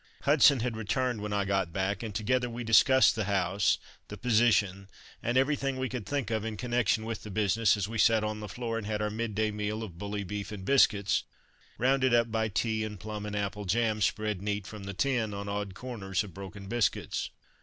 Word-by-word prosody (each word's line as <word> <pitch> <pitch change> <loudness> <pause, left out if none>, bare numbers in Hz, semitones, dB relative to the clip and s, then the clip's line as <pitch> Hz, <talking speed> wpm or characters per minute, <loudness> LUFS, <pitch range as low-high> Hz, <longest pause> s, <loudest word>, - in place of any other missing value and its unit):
Hudson 140 -3 +5
had 120 -1 -2
returned 120 +1 -1
when 105 0 -4
I 100 -1 0
got 95 -3 0
back, 95 +3 -1
and 110 -4 -6
together 125 +3 0
we 120 +1 -5
discussed 120 +4 +6
the 110 -2 -1
house, 95 0 +1 0.3
the - - -8
position, 105 -5 +2 0.3
and 120 +2 0
everything 135 0 +1
we 130 -1 -2
could 125 -5 -5
think 140 -6 -2
of 110 -1 0
in 110 -1 -4
connection 120 -1 +1
with 115 0 -4
the 105 - -9
business, 105 +2 +2
as 100 -1 -1
we 115 +1 -4
sat 110 -1 +4
on 105 0 -2
the 105 - -6
floor 115 0 -3
and 105 - -7
had 105 -1 -1
our 105 0 -1
midday 110 -1 -1
meal 105 +1 -3
of 90 -6 -9
bully 100 +1 -3
beef 100 +2 -5
and 100 -3 -7
biscuits, 105 -7 +3 0.5
rounded 130 0 +3
up 115 -1 +2
by 110 0 +1
tea 110 +1 -1
and 105 -2 -6
plum 105 +1 -5
and 105 - -4
apple 105 0 -3
jam 110 +2 +1
spread 105 -1 0
neat 105 -1 -2
from 105 -1 -8
the 100 0 -6
tin 115 -3 0
on 100 0 -5
odd 100 -1 -3
corners 105 -6 -3
of 100 -4 -10
broken 100 +1 -9
biscuits. 115 -1 -1
110 Hz, 210 wpm, -29 LUFS, 100-120 Hz, 0.5 s, discussed